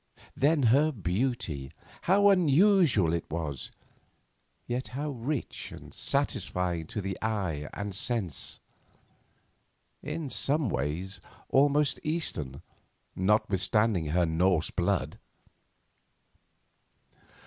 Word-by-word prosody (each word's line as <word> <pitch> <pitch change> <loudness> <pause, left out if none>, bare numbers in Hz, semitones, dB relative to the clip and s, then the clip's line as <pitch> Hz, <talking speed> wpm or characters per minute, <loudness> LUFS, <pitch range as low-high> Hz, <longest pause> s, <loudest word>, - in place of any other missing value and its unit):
Then 145 +1 +3
her 150 +3 +4
beauty—how 120 - 0
unusual 170 - +4
it 85 - -3
was, 75 -5 -4 1.0
yet 125 +2 -3
how 150 +1 -2
rich 130 +2 -4
and - - -11
satisfying 90 -3 -1
to 105 - -4
the 95 -1 -4
eye 95 -9 -2
and 100 -1 -5
sense; 100 - -3 1.4
in 155 -5 -4
some 140 +1 +1
ways 90 +6 -3 0.3
almost 145 +1 +3
Eastern 85 - -2 0.5
notwithstanding 105 -1 +2
her 85 +3 +2
Norse 85 +1 +1
blood! - - -1
105 Hz, 85 wpm, -29 LUFS, 85-140 Hz, 1.4 s, her